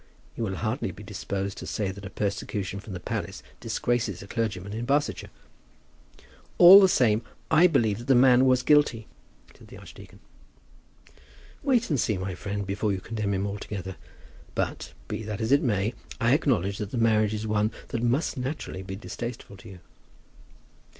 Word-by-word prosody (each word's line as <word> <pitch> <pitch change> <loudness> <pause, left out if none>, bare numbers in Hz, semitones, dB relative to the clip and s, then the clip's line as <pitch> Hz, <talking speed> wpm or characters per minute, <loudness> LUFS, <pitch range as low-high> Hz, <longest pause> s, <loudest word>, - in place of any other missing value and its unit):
You 115 - -2
will 95 -2 -3
hardly 110 +7 -2
be 105 - -10
disposed 100 -1 -4
to - - -7
say 100 -3 -2
that 100 0 -10
persecution 100 -1 -3
from 100 0 -9
the 90 - -5
palace - - -5 0.2
disgraces 120 -7 -2
a - - -12
clergyman 100 -3 -3
in 115 +2 -4
Barsetshire." 145 +3 0 1.3
"All 185 +3 +10
the 190 - +5
same, 115 -8 +3 0.3
I 175 +3 +7
believe 115 - +1
that 120 - -10
the 135 - +5
man 125 +1 +6
was 130 0 +3
guilty," 145 -7 +3 0.5
said - - -17
the - - -12
archdeacon. - - -13 1.4
"Wait 250 - +1
and 145 - +1
see, 105 -3 0
my 95 0 -4
friend, 100 +2 -4
before 100 +2 -1
you 95 - -2
condemn 105 -1 -3
him 95 +1 -1
altogether. 100 -2 -5 0.6
But, - - -3
be - - -4
that 105 -2 -5
as 110 +2 -1
it 140 +2 +5
may, 110 - 0 0.3
I 120 +1 +3
acknowledge 105 - +1
that 105 - -4
the 125 - -4
marriage 110 -2 +2
is 110 +1 -4
one 105 0 +1 0.2
which 115 - -2
must 125 +6 0
naturally 130 -7 -4
be 95 0 -7
distasteful 115 +1 -7
to 110 - -13
you." 95 -2 -11
110 Hz, 170 wpm, -26 LUFS, 100-125 Hz, 1.4 s, All